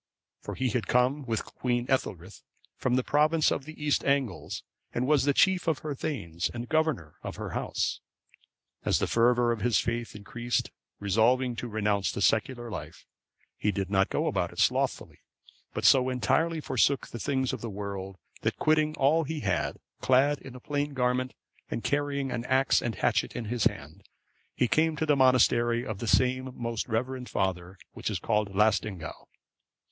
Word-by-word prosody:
For - - -7
he 130 -1 0
had 120 0 -1
come 130 +3 +2
with 115 -1 -1
Queen 120 -1 -2
Ethelthryth(550) 100 -8 -2 0.3
from 125 -1 0
the 130 - +2
province 155 +3 +3
of 135 - -2
the 155 +1 -10
East 145 - +2
Angles, 140 -7 -1 0.3
and 120 - +1
was 145 -1 +3
the 145 - +3
chief 190 -3 +3
of 160 -3 +2
her 150 - -1
thegns, 100 - -3
and 120 0 -5
governor 155 - 0
of - - -6
her - - -6
house. - - -2 0.8
As - - +2
the - - +1
fervour 120 +1 +3
of 115 -3 -2
his 120 +1 +3
faith 120 -1 -2
increased, 120 +4 -2 0.3
resolving 120 +5 +2
to 120 - -4
renounce 105 -2 0
the - - -5
secular 120 +2 +1
life, - - -8 0.5
he 105 - 0
did 100 0 -3
not 95 -1 +3
go - - 0
about - - 0
it - - -15
slothfully, - - 0 0.5
but - - -3
so 130 -1 +6
entirely 155 +7 +1
forsook 135 +1 +1
the 120 - -7
things 130 +1 0
of - - -5
this 115 - -4
world, 100 -2 -6 0.2
that, - - -1
quitting 155 0 +2
all 150 +4 +3
that 150 - -5
he 155 -2 -3
had, 95 -6 -1 0.2
clad 135 +2 +3
in 130 -2 -11
a - - -8
plain 145 +2 -2
garment, 125 0 0 0.3
and 115 - -3
carrying 140 -2 -1
an 120 - -2
axe 130 0 +3
and 120 -2 -2
hatchet - - 0
in 115 - -4
his 115 +1 -1
hand, 95 -5 -2 0.5
he 125 - +2
came 155 +4 +2
to 160 - -1
the 150 -2 +3
monastery 120 -2 +4
of 110 -3 -5
the 115 - -4
same 130 +3 +2
most 115 -2 -3
reverend 125 +3 -2
father, 95 0 -2 0.2
which - - -3
is 105 - -1
called 105 +2 0
Laestingaeu. 100 -4 +1
125 Hz, 180 wpm, -28 LUFS, 110-140 Hz, 0.8 s, so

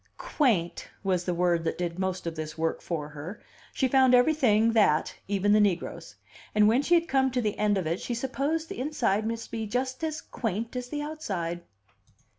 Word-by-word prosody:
"Quaint" 210 - 0 0.2
was 185 -2 0
the 180 - 0
word 175 -1 +2
that 165 - -2
did 175 0 -3
most 190 -1 -2
of 165 -1 -3
this 155 0 -6
work 160 0 -1
for 150 -4 -4
her; 155 +7 -8 0.3
she 265 - +1
found 260 -1 +5
everything 245 -5 +4
that, 200 -9 +3
even 200 +1 +2
the 215 - +5
negroes; 170 - -1 0.4
and 210 0 +6
when 235 +5 +4
she 345 +4 +3
had 335 0 +2
come 265 -2 +2
to 255 0 -1
the 215 -4 -1
end 210 -1 +2
of 185 - -1
it, 165 +3 -2
she 240 - -3
supposed 275 +6 -1
the - - -7
inside 230 -7 0
must 230 0 -4
be 220 -1 -3
just 255 +6 -2
as 310 -1 -2
"quaint" 225 +1 -4
as 250 0 -4
the 295 +1 -3
outside. 190 - -4
215 Hz, 200 wpm, -28 LUFS, 175-260 Hz, 0.4 s, and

